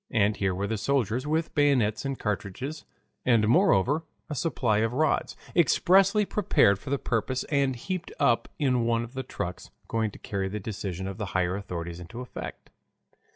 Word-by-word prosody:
And 105 -1 +2
here 95 -2 0
were 100 +2 -1
the 110 0 -2
soldiers 130 +1 0
with 160 +2 0
bayonets 130 -6 +2
and 135 -1 -2
cartridges, 105 - -4 0.4
and 115 -4 +4
moreover, 120 +5 +4 0.3
a - - 0
supply 125 -7 +1
of 115 +1 +1
rods, 155 +4 +1 0.2
expressly 190 +5 +4
prepared 185 - +3
for - - -8
the 140 - +1
purpose 125 +1 -1
and 140 -2 +2
heaped 180 +8 -4
up 115 - +3
in 125 -5 +2
one 115 0 +2
of 120 +1 -9
the 130 - -3
trucks, 90 -8 -5 0.2
going 110 -1 0
to - - -12
carry 95 -1 -3
the 105 +2 -4
decision 95 -3 -4
of 95 +2 -6
the 105 - -2
higher 90 0 +1
authorities 85 -3 -5
into 90 +8 -9
effect. 125 - -8
115 Hz, 175 wpm, -27 LUFS, 100-140 Hz, 0.4 s, and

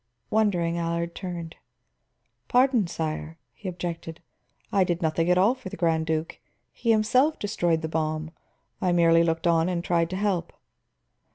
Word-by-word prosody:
Wondering, 175 -6 +1
Allard 170 0 -2
turned. 175 -3 -6 0.9
"Pardon, 250 -5 +3
sire," 160 -1 -4 0.2
he 195 - -6
objected, 170 -2 -5 0.5
"I 195 - +4
did 175 -2 -1
nothing 165 +2 +1
at 180 - +4
all 200 +6 +4
for 255 -7 -9
the - - -8
Grand 160 -2 +1
Duke. 160 0 -2 0.3
He 235 - -4
himself 250 +8 +3
destroyed 175 -6 0
the - - -1
bomb; 155 0 -2 0.5
I 180 -1 +2
merely 165 -1 +5
looked 165 0 -1
on 165 0 +3
and 175 -2 -2
tried 170 -2 +1
to 185 - -4
help." 190 -4 -1
170 Hz, 155 wpm, -26 LUFS, 165-190 Hz, 0.9 s, merely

